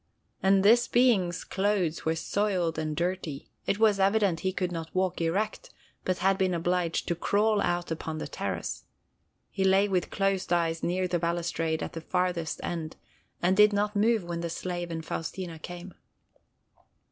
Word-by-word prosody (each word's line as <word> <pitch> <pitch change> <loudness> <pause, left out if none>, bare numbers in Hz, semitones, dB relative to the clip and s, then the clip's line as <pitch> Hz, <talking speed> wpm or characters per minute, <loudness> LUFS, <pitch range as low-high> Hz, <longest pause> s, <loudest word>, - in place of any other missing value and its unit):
And 195 0 +4
this 240 +3 +6
being's 215 -9 +3
clothes 190 -4 0
were 160 0 +1
soiled 180 -2 0
and 155 -1 -2
dusty. 170 -4 -3 0.2
It 200 - +1
was 215 -2 +4
evident 195 -3 +3
he 190 - -1
could 180 -1 -2
not 165 -2 -5
walk 185 -1 0
erect, 210 - -1 0.4
but 185 -1 0
had 195 0 +3
been 185 -2 +2
obliged 175 0 0
to - - +1
crawl 205 +4 +2
out 175 -2 -1
upon 160 0 -4
the - - -4
terrace. - - -4 0.7
He 195 - -1
lay 190 +1 +4
with 185 -3 0
closed 195 -2 0
eyes 165 -2 +1
near 185 +1 0
the 175 -1 0
balustrade 170 -1 -1
at - - -6
the 165 - -5
farthest 180 -2 -1
end, 165 -2 -4 0.5
and 185 +2 +4
did 210 +1 +6
not 205 +1 0
move 220 0 +3
when 170 -1 -4
the 170 - -3
slave 175 +1 -4
and 160 -1 -5
Faustina 165 +1 -5
came. 175 +2 -8
180 Hz, 170 wpm, -28 LUFS, 170-195 Hz, 0.7 s, this